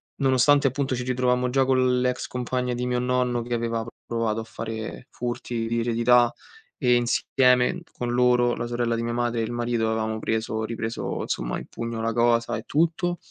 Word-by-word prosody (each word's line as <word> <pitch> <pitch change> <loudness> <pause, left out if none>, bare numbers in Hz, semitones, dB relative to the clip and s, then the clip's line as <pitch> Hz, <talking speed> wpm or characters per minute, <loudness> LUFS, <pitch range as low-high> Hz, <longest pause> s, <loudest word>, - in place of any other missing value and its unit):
nonostante 140 +1 +4
appunto 135 0 -1
ci 125 -1 -2
ritrovammo 125 0 +1
già 135 +2 +3
con 130 -1 +2
l'ex 125 0 -1
compagna 125 0 -2
di 125 +1 -2
mio 125 0 0
nonno 125 -1 0
che 120 +1 -4
aveva 115 -1 -1
p - - -13 0.2
provato 115 -2 -1
a - - -6
fare 110 +1 -6
furti 120 -1 -4
di 115 +1 0
eredità, 120 +1 +3 0.4
e 125 -4 +3
insieme 125 +5 +2
con 120 -1 -4
loro, 125 0 +3
la 120 - -3
sorella 120 -1 -1
di 115 - -2
mia 120 0 -2
madre 120 -1 0
e - - 0
il 110 - -3
marito 120 -1 0
avevamo 110 0 -1
preso 110 0 -2
ripreso 115 0 -3
insomma - - -2
in - - -7
pugno 115 -1 -5
la 115 0 -1
cosa 115 0 +2
e 110 - -7
tutto. 170 +3 +1
120 Hz, 190 wpm, -25 LUFS, 115-125 Hz, 0.4 s, nonostante